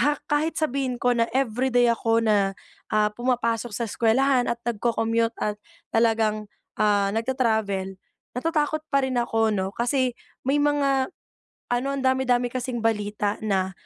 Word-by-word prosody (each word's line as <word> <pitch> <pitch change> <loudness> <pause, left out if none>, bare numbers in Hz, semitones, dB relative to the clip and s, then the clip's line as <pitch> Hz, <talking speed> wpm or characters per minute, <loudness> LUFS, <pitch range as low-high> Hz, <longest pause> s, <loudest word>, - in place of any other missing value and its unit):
ha 290 +4 +3 0.2
kahit 310 +2 +1
sabihin 275 -4 -1
ko 245 - +2
na 230 0 +2
everyday 245 -1 +2
ako 225 0 +1
na, 200 -3 +2 0.4
ah, 210 0 +3
pumapasok 240 -1 -1
sa 235 - -1
eskuwelahan, 245 +4 +2
at 235 - -1
nagco-commute 230 0 0
at 210 0 -1 0.4
talagang, 220 -2 +2 0.3
ah, 205 -2 +3
nagta-travel, 220 -5 0 0.4
Natatakot 310 +2 0
pa 275 -1 +2
rin 255 -1 -3
ako 225 -2 +1
'no. 190 -1 -1
Kasi 250 +1 +1 0.3
may 275 - +3
mga 280 -2 +1 0.6
ano, 255 +3 0
ang - - -2
dami-dami 255 -2 +2
kasing 255 -1 -3
balita 210 -2 0
na, 190 -3 0
235 Hz, 140 wpm, -25 LUFS, 215-260 Hz, 0.6 s, ha